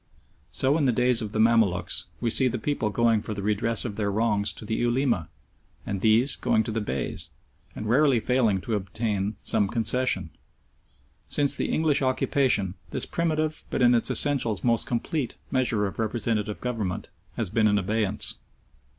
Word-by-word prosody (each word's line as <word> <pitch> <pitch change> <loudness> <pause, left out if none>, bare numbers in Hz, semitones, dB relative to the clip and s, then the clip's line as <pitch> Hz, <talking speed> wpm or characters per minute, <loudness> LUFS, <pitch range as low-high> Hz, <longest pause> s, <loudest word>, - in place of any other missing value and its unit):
So 140 +4 +2
in 145 - +1
the 130 - +3
days 125 0 +2
of 105 -2 -5
the 110 - -4
Mamaluks, 110 -5 +2
we 115 -1 -1
see 130 +3 +5
the 125 0 -2
people 115 -2 -2
going 115 0 +2
for 110 - -5
the 100 - -5
redress 105 +3 +2
of 105 -4 -5
their 105 -2 -1
wrongs 105 0 0
to - - -8
the 110 - -3
Ulema, 120 - 0 0.6
and 100 -2 -4
these 115 +5 +4
going 110 - +1
to 110 - -5
the 110 0 -2
Beys, 70 -10 -4 0.5
and 110 - -6
rarely 130 +1 +3
failing 115 -5 +1
to 115 - -4
obtain 105 0 -2
some 100 - +2
concession. 120 +4 +1 1.0
Since 140 -1 +3
the - - -2
English 155 -3 +1
occupation 130 -6 +1 0.2
this - - -3
primitive, 155 -2 -1
but - - -1
in 120 0 +5
its 115 - +1
essentials 125 -8 +1
most 115 -2 +1
complete, 125 +3 -3
measure 115 -5 +1
of 100 - -6
representative 110 -1 -2
government, 110 -7 -3 0.3
has - - -2
been 110 0 +3
in 105 0 +2
abeyance. 105 +1 0
115 Hz, 170 wpm, -25 LUFS, 105-125 Hz, 1.0 s, see